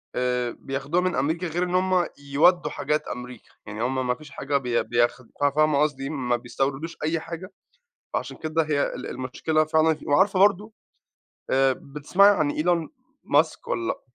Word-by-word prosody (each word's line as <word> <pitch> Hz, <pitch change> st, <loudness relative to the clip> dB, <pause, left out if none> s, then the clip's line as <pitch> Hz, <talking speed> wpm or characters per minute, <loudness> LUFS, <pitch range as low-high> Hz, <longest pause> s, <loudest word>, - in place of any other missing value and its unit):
آآ 125 Hz, -1 st, 0 dB
بياخدوها 140 Hz, +6 st, -1 dB
من 185 Hz, -1 st, 0 dB
أمريكا 160 Hz, +6 st, 0 dB
غير 170 Hz, +2 st, -1 dB
إن 180 Hz, 0 st, -1 dB
هُم 185 Hz, -1 st, +2 dB, 0.2 s
يودوا 175 Hz, +5 st, +4 dB
حاجات 150 Hz, 0 st, -1 dB
أمريكا، 125 Hz, -1 st, -8 dB, 0.2 s
يعني 110 Hz, +2 st, -5 dB
هُم 130 Hz, 0 st, -1 dB
ما 125 Hz, -, +1 dB
فيش 150 Hz, +2 st, -14 dB
حاجة 140 Hz, 0 st, -1 dB
بي 120 Hz, -3 st, 0 dB
بياخ 120 Hz, +1 st, +1 dB, 0.2 s
ف -, -, +1 dB
فاهمة 150 Hz, 0 st, +3 dB
قصدي، 140 Hz, -2 st, -1 dB
ما 125 Hz, -5 st, -1 dB
بيستوردوش 135 Hz, +6 st, -3 dB
أي 160 Hz, +2 st, 0 dB
حاجة، 170 Hz, +4 st, -8 dB, 0.6 s
فعشان -, -, -3 dB
كده 160 Hz, +1 st, 0 dB
هي 150 Hz, -2 st, 0 dB
ال -, -, -7 dB
المشكلة 145 Hz, +5 st, -1 dB
فعلًا 155 Hz, 0 st, +2 dB
وعارفة 190 Hz, +7 st, +3 dB
برضه 205 Hz, +2 st, +3 dB, 0.8 s
آآ 135 Hz, 0 st, +4 dB
بتسمعي 150 Hz, +10 st, +3 dB
عن 150 Hz, -3 st, +1 dB
إيلون 165 Hz, +1 st, 0 dB, 0.3 s
ماسك -, -, +1 dB
والّا 115 Hz, -1 st, -1 dB
لأ؟ -, -, -2 dB
150 Hz, 165 wpm, -25 LUFS, 130-170 Hz, 0.8 s, يودوا